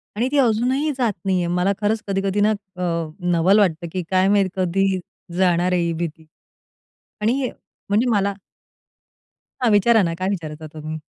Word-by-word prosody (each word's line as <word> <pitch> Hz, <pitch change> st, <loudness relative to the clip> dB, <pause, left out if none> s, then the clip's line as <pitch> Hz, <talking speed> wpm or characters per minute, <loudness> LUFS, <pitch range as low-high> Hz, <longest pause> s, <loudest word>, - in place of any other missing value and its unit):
आणि 235 Hz, +4 st, 0 dB
ती 290 Hz, -, +1 dB
अजूनही 260 Hz, +4 st, +2 dB
जात 240 Hz, -5 st, +1 dB
नाहीये. 185 Hz, -2 st, +1 dB
मला 180 Hz, +3 st, +1 dB
खरंच 215 Hz, +1 st, +1 dB
कधी-कधी 195 Hz, 0 st, 0 dB
ना 210 Hz, +1 st, +4 dB
अ, 195 Hz, -3 st, -6 dB, 0.5 s
नवल 180 Hz, +5 st, +4 dB
वाटतं, 170 Hz, -3 st, +1 dB
की 185 Hz, 0 st, -3 dB
काय 185 Hz, 0 st, +3 dB
माहित 200 Hz, -2 st, +3 dB
कधी 190 Hz, +1 st, +1 dB, 0.4 s
जाणार 180 Hz, -1 st, +2 dB
आहे 180 Hz, -, +2 dB
ही 170 Hz, 0 st, 0 dB
भीती? 160 Hz, -1 st, -5 dB, 1.0 s
आणि 220 Hz, +3 st, +2 dB
हे 255 Hz, -, -1 dB, 0.4 s
म्हणजे 215 Hz, +5 st, +2 dB
मला 200 Hz, -2 st, +1 dB, 1.3 s
हा, 245 Hz, -, +4 dB
विचारा 220 Hz, +2 st, +5 dB
ना 165 Hz, -, -1 dB
काय 185 Hz, +1 st, -1 dB
विचारता 155 Hz, -5 st, -5 dB
तुम्ही? 155 Hz, 0 st, -6 dB
195 Hz, 160 wpm, -21 LUFS, 175-210 Hz, 1.3 s, विचारा